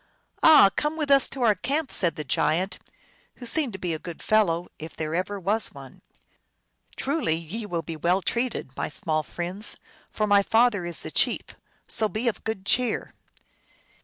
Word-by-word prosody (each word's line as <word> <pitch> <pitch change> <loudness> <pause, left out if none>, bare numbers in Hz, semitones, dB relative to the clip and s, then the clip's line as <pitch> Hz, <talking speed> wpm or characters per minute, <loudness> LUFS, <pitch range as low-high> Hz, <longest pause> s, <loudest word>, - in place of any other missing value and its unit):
"Ah, 295 -11 +8
come 300 +2 -1
with 300 -3 -1
us 275 -1 +6
to 265 - -4
our 220 -3 +5
camp," 275 - -2
said 170 -4 +1
the 155 - -4
giant, 175 +7 0 0.6
who 245 - -10
seemed 270 +2 -1
to - - -5
be 180 -3 -3
a 160 - -4
good 170 0 -8
fellow, 180 -6 +2
if 160 +1 -8
there 155 0 -3
ever 185 +4 -2
was 205 +4 -1
one. 135 -2 -12 0.5
" - - -34
Truly, 275 - 0
ye 180 +7 -6
will 170 -4 -2
be 165 - -6
well 175 +4 +1
treated, 235 - -2
my - - -3
small 155 -1 0
friends, 180 +6 -2 0.3
for 215 - -1
my 205 -1 +5
father 225 -3 +2
is 170 - -5
the - - -6
chief; - - 0 0.3
so 220 -2 -1
be 220 +4 -2
of 230 - -1
good 220 -4 -4
cheer 245 +1 +1
200 Hz, 185 wpm, -25 LUFS, 170-235 Hz, 0.6 s, Ah